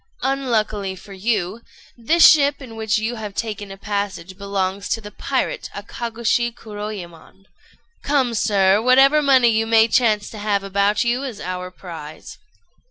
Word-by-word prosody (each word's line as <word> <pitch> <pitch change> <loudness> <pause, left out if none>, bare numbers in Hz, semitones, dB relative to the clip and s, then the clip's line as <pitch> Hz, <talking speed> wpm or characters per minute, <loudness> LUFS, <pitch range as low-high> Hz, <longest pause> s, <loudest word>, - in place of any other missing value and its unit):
Unluckily 220 -8 -1
for 195 +2 -13
you, 200 0 -2 0.3
this 315 +9 +5
ship 285 -2 +4
in 250 -5 -10
which 220 0 0
you 225 +3 -2
have 210 -2 -7
taken 210 -3 -4
a 195 - -9
passage 195 -3 -4
belongs 200 0 -3
to - - 0
the 210 -1 -10
pirate - - -2
Akagôshi 235 0 -2
Kuroyémon. 205 -5 -9 0.6
Come, 270 -4 +1
sir! 200 -2 +3
whatever 270 +5 +5
money 260 -4 +5
you 225 0 +1
may 225 0 +5
chance 220 -3 +2
to 215 - -9
have 205 -1 0
about 200 +2 +1
you 240 +2 0
is 250 -7 -6
our 180 0 -5
prize." 165 -5 -10
215 Hz, 150 wpm, -21 LUFS, 195-240 Hz, 0.6 s, this